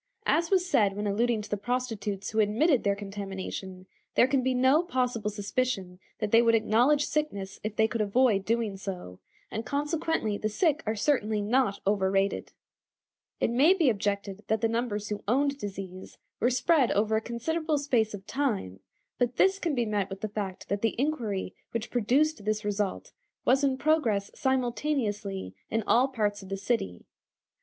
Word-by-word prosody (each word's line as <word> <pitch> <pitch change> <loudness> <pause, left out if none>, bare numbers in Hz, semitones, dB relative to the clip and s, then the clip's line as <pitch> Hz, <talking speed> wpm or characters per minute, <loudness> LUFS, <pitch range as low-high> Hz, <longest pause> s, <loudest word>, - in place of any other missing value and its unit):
As 335 0 +2
was 370 -2 +2
said 205 - +3
when 205 +1 -3
alluding 220 +2 +1
to 210 - -10
the 205 - 0
prostitutes 215 -4 -3
who 220 - 0
admitted 230 +7 +3
their 200 -1 +2
contamination, 195 -2 -6 0.3
there - - +6
can 265 0 +1
be 255 0 0
no 260 +5 +4
possible 250 - -1
suspicion 205 -3 -2 0.2
that 215 -1 -3
they 230 - +7
would 230 -1 +4
acknowledge 245 +7 +3
sickness 200 -11 -3
if 215 0 -3
they 220 0 +4
could 225 0 -2
avoid 210 -1 +3
doing 220 -2 -1
so, 180 - -7 0.3
and 220 - -3
consequently 290 -4 -1
the 215 - -1
sick 310 - +1
are 215 - +1
certainly 220 -3 +1
not 215 0 +1
overrated. 195 0 +1 0.9
It - - +1
may 290 +10 +5
be 320 -9 +4
objected 200 -1 -3
that 220 0 +1
the 225 - +3
numbers 225 -3 -2
who 210 -1 -3
owned 280 +4 +1
disease 190 -3 -7 0.2
were 245 - +3
spread 265 +1 +3
over 215 +2 +2
a 220 - +1
considerable 310 +7 -1
space 240 -7 +1
of 195 -1 -11
time, 210 - -2 0.4
but 245 0 +1
this 385 0 +3
can 330 -6 -1
be 240 -2 +1
met 205 -3 -1
with 195 0 -7
the 215 - -2
fact 200 -3 -5
that 200 0 -1
the 225 0 0
inquiry 230 -11 -1 0.2
which 230 0 -3
produced 250 +3 +2
this 215 0 -1
result 205 -1 -2 0.3
was 270 +3 +4
in 270 -2 +2
progress 255 -10 +1
simultaneously 240 - -1 0.2
in 225 0 0
all 250 +3 +4
parts 210 -6 -1
of 190 - -11
the 195 - -2
city. 195 - -2
220 Hz, 175 wpm, -28 LUFS, 200-260 Hz, 0.9 s, they